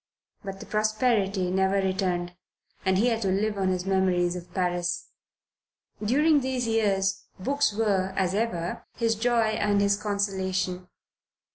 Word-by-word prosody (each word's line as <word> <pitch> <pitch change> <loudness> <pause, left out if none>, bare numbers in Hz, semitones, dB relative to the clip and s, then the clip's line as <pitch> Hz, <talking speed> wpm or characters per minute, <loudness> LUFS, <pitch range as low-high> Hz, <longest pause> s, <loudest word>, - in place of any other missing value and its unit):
But 195 -1 -6
the - - -9
prosperity 215 -4 +1
never 190 +1 +2
returned, 185 -2 -1 0.5
and 190 0 +2
he 235 +5 +3
had 225 -1 -1
to 200 - 0
live 205 +3 0
on 190 - +1
his 185 -1 -1
memories 185 -2 +1
of 180 -1 -8
Paris. 175 -1 -1 0.9
During 295 +7 +4
these 260 -2 -2
years 200 -4 +1
books 280 +6 +1
were, 200 -3 0
as 185 -1 +1
ever, 195 -6 -2
his 230 -1 +1
joy 230 0 +2
and 205 -1 +2
his 200 0 +3
consolation. 190 -3 -1
195 Hz, 140 wpm, -26 LUFS, 185-220 Hz, 0.9 s, During